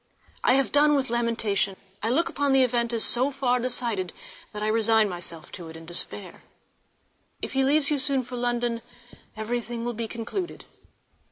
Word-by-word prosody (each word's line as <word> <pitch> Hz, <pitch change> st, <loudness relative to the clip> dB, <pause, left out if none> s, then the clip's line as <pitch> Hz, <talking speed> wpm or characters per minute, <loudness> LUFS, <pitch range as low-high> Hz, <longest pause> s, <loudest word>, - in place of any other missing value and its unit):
I 250 Hz, -, +5 dB
have 275 Hz, 0 st, +1 dB
done 295 Hz, +1 st, +5 dB
with 265 Hz, -4 st, -1 dB
lamentation; 225 Hz, -5 st, +1 dB, 0.3 s
I 220 Hz, -, -1 dB
look 315 Hz, +8 st, +2 dB
upon 285 Hz, -1 st, 0 dB
the 265 Hz, -1 st, +6 dB
event 240 Hz, -1 st, +2 dB
as 230 Hz, -2 st, 0 dB
so 255 Hz, +3 st, +3 dB
far 260 Hz, -3 st, 0 dB
decided 235 Hz, -7 st, -2 dB, 0.4 s
that 210 Hz, 0 st, -5 dB
I -, -, 0 dB
resign 220 Hz, 0 st, +3 dB
myself 175 Hz, -3 st, -7 dB
to 170 Hz, -3 st, -7 dB
it 160 Hz, -, -10 dB
in 165 Hz, -, -12 dB
despair. 175 Hz, +2 st, -3 dB, 1.0 s
If -, -, -4 dB
he 270 Hz, -, +2 dB
leaves 280 Hz, +2 st, +4 dB
you 290 Hz, -, +1 dB
soon 270 Hz, -1 st, +4 dB
for 250 Hz, +1 st, -8 dB
London 240 Hz, -1 st, -1 dB, 0.6 s
everything 235 Hz, +1 st, -3 dB
will 240 Hz, -, -2 dB
be 230 Hz, 0 st, -4 dB
concluded. 240 Hz, -, -5 dB
240 Hz, 175 wpm, -26 LUFS, 220-265 Hz, 1.0 s, the